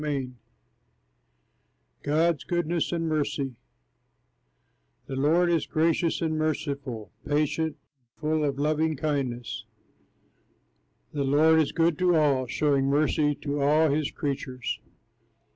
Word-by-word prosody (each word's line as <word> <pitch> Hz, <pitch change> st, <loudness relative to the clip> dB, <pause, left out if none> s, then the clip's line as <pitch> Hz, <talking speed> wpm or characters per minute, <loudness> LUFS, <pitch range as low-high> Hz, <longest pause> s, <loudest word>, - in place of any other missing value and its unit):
Taylor] 140 Hz, -4 st, -2 dB, 1.7 s
GOD'S 155 Hz, +1 st, +1 dB
GOODNESS 175 Hz, -1 st, -1 dB
AND 165 Hz, -1 st, -1 dB
MERCY 145 Hz, -3 st, -1 dB, 1.5 s
The 135 Hz, -, -5 dB
Lord 165 Hz, +6 st, +3 dB
is 165 Hz, -2 st, +1 dB
gracious 165 Hz, +1 st, +1 dB
and 155 Hz, -1 st, 0 dB
merciful, 140 Hz, -7 st, -3 dB
Patient, 150 Hz, +1 st, 0 dB
and 135 Hz, -5 st, -43 dB
full 155 Hz, 0 st, 0 dB
of 140 Hz, -2 st, -1 dB
loving 155 Hz, +2 st, +1 dB
kindness. 135 Hz, -5 st, -2 dB, 1.5 s
The 145 Hz, -2 st, -1 dB
Lord 155 Hz, +4 st, +4 dB
is 155 Hz, -, +1 dB
good 165 Hz, -2 st, +1 dB
to 180 Hz, -1 st, +3 dB
all, 140 Hz, -5 st, +2 dB
Showing 140 Hz, +1 st, +1 dB
mercy 145 Hz, +1 st, +2 dB
to 145 Hz, -1 st, -2 dB
all 150 Hz, +2 st, +4 dB
his 150 Hz, 0 st, 0 dB
creatures. 130 Hz, -3 st, -4 dB
150 Hz, 110 wpm, -27 LUFS, 140-160 Hz, 1.7 s, Lord